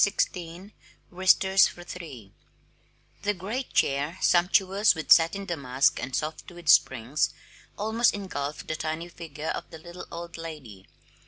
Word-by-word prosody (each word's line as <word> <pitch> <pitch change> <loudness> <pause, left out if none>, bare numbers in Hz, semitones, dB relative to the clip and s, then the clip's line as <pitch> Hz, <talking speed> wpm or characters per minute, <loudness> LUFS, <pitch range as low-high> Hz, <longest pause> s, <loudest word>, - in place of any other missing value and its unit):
J. 200 - +4 0.2
D. 180 -2 -7
DARLING 180 +5 -12 0.4
Wristers 190 +1 +4
for 175 - -10
Three 145 - -10 0.9
The 205 0 0
great 220 +9 -5
chair, 145 +5 +1
sumptuous 190 +3 +3
with 160 - -6
satin 175 +4 +5
damask 140 -6 +1
and 130 0 -4
soft 155 +4 -4
with 175 -2 -7
springs, 135 +1 +3 0.5
almost 220 +3 +2
engulfed 150 -8 -5
the 155 - -2
tiny 160 +2 -4
figure 160 -2 -7
of - - -4
the 160 - -10
little 175 +3 -10
old 170 0 -7
lady. 140 -13 -9
170 Hz, 145 wpm, -27 LUFS, 150-190 Hz, 0.9 s, satin